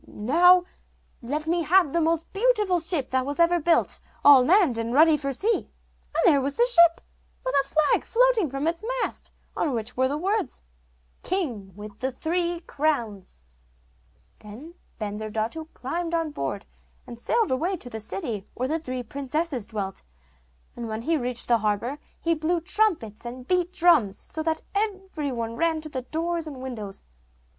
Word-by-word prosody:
'Now 350 +11 +4 0.6
let 290 +6 -3
me 340 +2 +1
have 340 -2 +3
the 340 - +2
most 325 0 0
beautiful 420 -4 +2
ship 325 -5 -1
that 260 - +2
ever 335 +6 +2
was 330 - -5
built, 335 0 +2 0.3
all 280 -3 +9
manned 330 - +4
and 230 +2 -2
ready 315 +1 +6
for 275 -2 -2
sea.' 420 - 0 0.5
And - - +2
there 295 -7 +5
was 275 +1 -2
the 475 - +4
ship, 340 -8 +6 0.4
with - - -1
a 275 - -11
flag 310 -1 +2
floating 470 - +2
from 275 +2 -3
its 335 +4 -1 0.2
mast - - -4 0.2
on 285 -6 0
which 230 +2 -4
were 260 +1 +2
the 285 +3 -2
words, 390 - -2 0.6
'King 250 - -2
with 205 0 -10
the 260 +1 -1
three 340 +5 -1
crowns.' 230 - -2 1.0
Then 240 +11 -11 0.3
Bensurdatu 215 +7 -4
climbed 335 +6 -3
on 325 -2 -1
board, 290 - -4 0.4
and 235 -1 -10
sailed 450 - +1
away 340 +9 0
to 250 - -7
the 220 - -5
city 205 0 -4
where 255 - -1
the 320 +2 0
three 255 -5 -5
princesses 275 -1 -3
dwelt; 200 -4 -5 0.7
and 235 - -5
when 220 +1 -4
he 330 +5 +1
reached 250 -4 -1
the 235 -1 +3
harbour 220 +7 -1 0.2
he 335 - +1
blew 325 +2 0
trumpets 340 - 0
and 250 +1 -8
beat 360 -1 +1
drums, 310 - +3
so 315 - -6
that 320 0 -1
every 385 -8 -2
one 230 -2 -4
ran 330 -1 +1
to 310 - -5
the 260 -3 -4
doors 330 +4 -3
and 285 -3 -7
windows. 225 -7 -6
300 Hz, 170 wpm, -25 LUFS, 240-340 Hz, 1.0 s, all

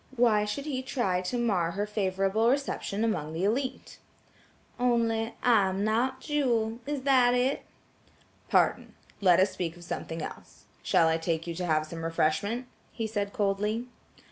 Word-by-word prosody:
Why 225 -4 +3
should 275 +7 -4
he 270 -4 -2
try 220 -9 -1
to 185 +7 -3
mar 190 -8 +1
her 205 +3 -1
favorable 200 +1 +1
reception 255 -6 -1
among 155 -9 -1
the 165 +3 -2
élite. 250 +6 -2 0.8
"Only, 230 -2 +1
I 220 -6 +4
am 190 +2 -2
not 245 +5 0
Jewel; 235 -7 0
is 290 -2 -3
that 255 -3 +4
it?" 255 +2 +1 0.9
"Pardon. - - +2 0.3
Let 180 -3 +5
us 190 +1 +3
speak 170 -1 -4
of 175 - -12
something 165 -2 -5
else. - - -10 0.2
Shall 165 - +3
I 160 0 +2
take 165 0 -2
you 170 - -4
to 180 +1 -3
have 155 -1 +2
some 165 +1 -7
refreshment?" 165 +9 0 0.3
he 225 - -4
said 205 -2 -2
coldly. 210 +3 0
210 Hz, 160 wpm, -28 LUFS, 180-245 Hz, 0.9 s, Let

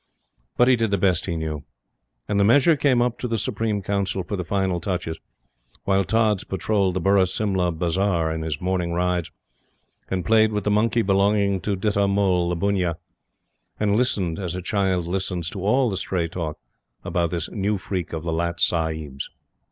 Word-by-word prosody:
But 120 - +5
he 130 - +6
did 115 -2 0
the 100 - +1
best 90 -2 +1
he 85 - -2
knew. 80 -2 -4 0.6
And 100 - 0
the - - +5
measure 145 +9 +5
came 130 -4 +3
up 120 -1 -2
to 125 - -2
the 115 -1 -1
Supreme 110 -3 -1
Council 100 -1 -1
for 100 - -4
the 90 - -3
final 95 -1 0
touches, 85 -3 -3 0.6
while 95 0 +2
Tods 110 -1 +1
patrolled 95 0 0
the - - +1
Burra 95 +1 +3
Simla 95 -2 0
Bazar 85 0 0
in 80 0 -3
his 80 -3 -3
morning 90 -2 -1
rides, 90 -1 0 0.8
and 90 -3 -2
played 110 0 +4
with 105 -1 -1
the 105 - +1
monkey 110 +2 +2
belonging 100 0 +2
to 105 - -1
Ditta 100 +1 +1
Mull, 95 -3 +2
the 90 - 0
bunnia, 90 -2 0 0.8
and 105 -1 +2
listened, 100 -8 0
as 90 -2 -3
a 90 - -4
child 95 -3 0
listens 90 -1 -2
to 95 - -6
all 125 +6 +3
the 95 -4 -2
stray 90 -3 -1
talk 80 -2 -4 0.5
about 85 -1 0
this 85 -1 -3
new 105 0 0
freak 95 -3 -4
of 80 -1 -4
the 85 -1 -2
Lat 85 +1 -1
Sahib's. 80 -5 -1
95 Hz, 185 wpm, -23 LUFS, 85-105 Hz, 0.8 s, he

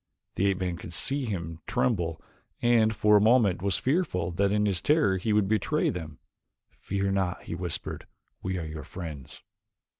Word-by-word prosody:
The 100 - +1
ape 100 -2 +1
man 90 -2 -2
could 95 -3 -9
see 135 +9 0
him 85 -7 -4
tremble 95 -11 0 0.4
and 115 -2 +4
for 105 -1 +4
a - - +4
moment 110 -5 +4
was 100 0 +1
fearful 130 - 0
that 100 +3 +1
in 105 0 +2
his 95 -3 0
terror 150 -11 +3
he 100 +4 -1
would 105 -2 +3
betray 110 -1 +1
them. 80 -4 -7 0.6
"Fear 100 0 -1
not," 95 -2 -1
he - - -6
whispered, 85 -1 -3 0.3
"we 95 0 -2
are 85 - -4
your 80 0 -7
friends." 80 -8 -8
95 Hz, 175 wpm, -28 LUFS, 85-110 Hz, 0.6 s, and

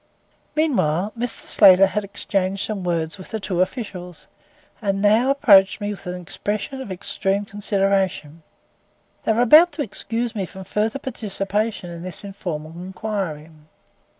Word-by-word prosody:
Meanwhile, 210 - +1
Mr. 240 +1 +1
Slater 195 -1 +7
had 210 +2 -2
exchanged 195 -1 -2
some 210 -4 -4
words 170 0 -2
with 185 - -10
the 220 - -4
two 190 -3 -1
officials, 185 -4 -4 0.6
and 195 -2 -1
now 215 +5 +3
approached 210 -10 +5
me 205 0 -3
with 200 - -9
an 180 0 -4
expression 210 +8 -4
of 220 - -7
extreme 195 +2 0
consideration. 195 -6 -1 0.8
They 220 - +3
were 235 +2 +2
about 310 +8 +7
to 295 - -2
excuse 230 +1 -3
me 195 -5 -3
from 190 +1 -10
further 215 +6 -1
participation 210 -6 -3
in 170 0 -8
this 185 +3 -5
informal 170 -6 -6
inquiry. 180 -3 -5
195 Hz, 145 wpm, -22 LUFS, 185-220 Hz, 0.8 s, Slater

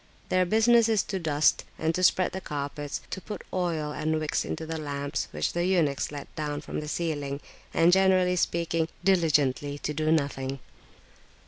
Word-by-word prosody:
Their 185 0 +3
business 225 +3 +5
[p.373]is 220 -3 +1
to 195 - -1
dust, 150 -3 +2
and 160 +1 0
to 180 - -1
spread 185 0 +3
the 190 - -5
carpets, 145 -1 -4
to 190 +1 -4
put 210 - -7
oil 165 -5 -1
and 155 +1 -1
wicks 155 -1 -1
into 160 - -4
the 160 0 -4
lamps 145 -1 -3
which 75 0 -2
the 175 - 0
eunuchs 165 -8 +1
let 145 -1 -8
down 150 -2 -3
from 150 - -5
the 150 - -6
ceiling, 145 -4 -2 0.3
and, 165 +1 +4
generally 185 -1 +4
speaking, 165 -2 0 0.2
diligently 145 -6 +2
to 150 - -3
do 155 +1 0
nothing. 140 -3 0
160 Hz, 170 wpm, -27 LUFS, 145-180 Hz, 0.3 s, business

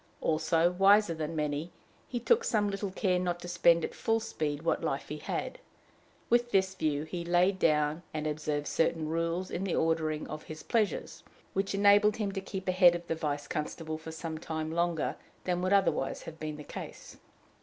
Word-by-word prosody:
Also, 165 +2 +2
wiser 195 0 +5
than 160 0 -4
many, 150 +2 -2 0.4
he 245 - -3
took 465 - +3
some 205 - +1
little 200 0 -3
care 185 -1 +1
not 175 -1 -1
to 175 - -8
spend 170 -1 +4
at - - -7
full 225 0 +1
speed 155 -9 -3
what 165 - 0
life - - -2
he - - -4
had. - - -4 0.7
With 240 0 +3
this 190 -3 +2
view 150 -5 -1
he 170 +2 -5
laid 180 +3 +2
down 150 0 +2
and 155 -1 -3
observed 150 -1 -2
certain 165 +1 0
rules 165 +3 -1
in 180 - -2
the 195 - -1
ordering 160 -1 0
of 155 0 -6
his 155 0 -9
pleasures, 220 -4 -1 0.3
which 195 +1 -1
enabled 205 +1 +5
him 210 -3 -2
to 195 -1 -4
keep 190 -1 -6
ahead 180 -1 +6
of 175 0 -6
the 165 - -1
vice 145 -2 -3
constable 155 +1 -4
for 160 0 -8
some 160 -1 -5
time 160 -1 -4
longer 170 -1 0 0.3
than 180 -1 -1
would 185 +1 0
otherwise 195 -9 +2
have 160 -1 -9
been 155 -1 -4
the 150 - -8
case. - - -9
170 Hz, 190 wpm, -30 LUFS, 155-195 Hz, 0.7 s, ahead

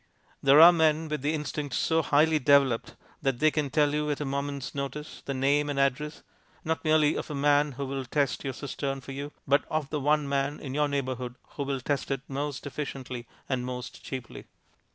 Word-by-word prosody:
There 140 +2 +6
are 170 +2 +11
men 160 -1 +2
with 150 -2 -2
the 150 +3 0
instinct 150 -2 -4
so 165 0 +2
highly 155 +1 +3
developed 135 -4 +3 0.3
that 135 -3 0
they 155 +4 +4
can 150 -3 -1
tell 150 0 +2
you 150 0 0
at 145 - -1
a 150 - -2
moment's 140 0 -3
notice 145 +2 -5
the 140 - -3
name 145 +3 +2
and 140 -1 -1
address, 140 +3 0 0.4
not 160 +1 -1
merely 155 -1 +4
of - - -4
a 150 - -4
man 145 0 +3
who 140 +3 -4
will 135 0 -4
test 140 +2 0
your 135 - -3
cistern 135 0 -4
for 135 - -9
you, 140 +2 -5 0.2
but 140 +1 +4
of 155 -2 -2
the 150 - -1
one 150 +1 +2
man 140 +1 -1
in 130 -2 -6
your 150 +1 +2
neighbourhood 130 -3 -3
who - - -7
will 135 -1 -2
test 140 +1 -2
it 135 -2 -1
most 140 0 -4
efficiently 130 -4 -5 0.2
and 130 -2 -1
most 125 -1 -6
cheaply. 130 -3 -7
140 Hz, 205 wpm, -28 LUFS, 135-150 Hz, 0.4 s, are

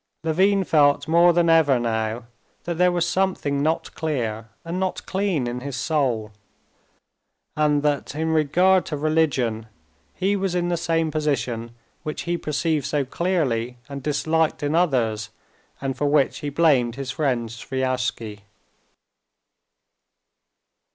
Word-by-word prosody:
Levin 190 +5 +2
felt 145 -3 +3
more 170 +2 +5
than 170 0 +2
ever 160 -5 +5
now 110 0 -2 0.4
that 170 -1 -4
there 180 0 +5
was 175 -1 0
something 175 -7 0
not 160 +3 -1
clear 115 -8 -3 0.2
and 170 +2 -3
not 190 -1 -2
clean 190 -8 -1
in 120 +1 -3
his 135 +1 -6
soul, 125 -9 -1 1.2
and 150 -1 +2
that, 145 -1 -1
in 160 +1 -1
regard 175 +5 +3
to 150 - -4
religion, 140 -8 0 0.5
he 195 +2 +1
was 195 -2 -1
in 175 0 0
the 175 - +1
same 165 -2 0
position 120 -6 -2 0.3
which 155 -3 -5
he 175 0 -1
perceived 155 -2 -1
so 145 -2 0
clearly 130 -7 -1
and 140 -1 -7
disliked 155 +3 0
in 145 +1 0
others, 120 -11 +1 0.5
and 135 -1 -3
for 145 +4 0
which 145 -1 +2
he 145 - -4
blamed 140 -6 +2
his 135 -1 -4
friend 125 -6 -1
Sviazhsky. 125 -3 -3
150 Hz, 135 wpm, -23 LUFS, 125-165 Hz, 1.2 s, more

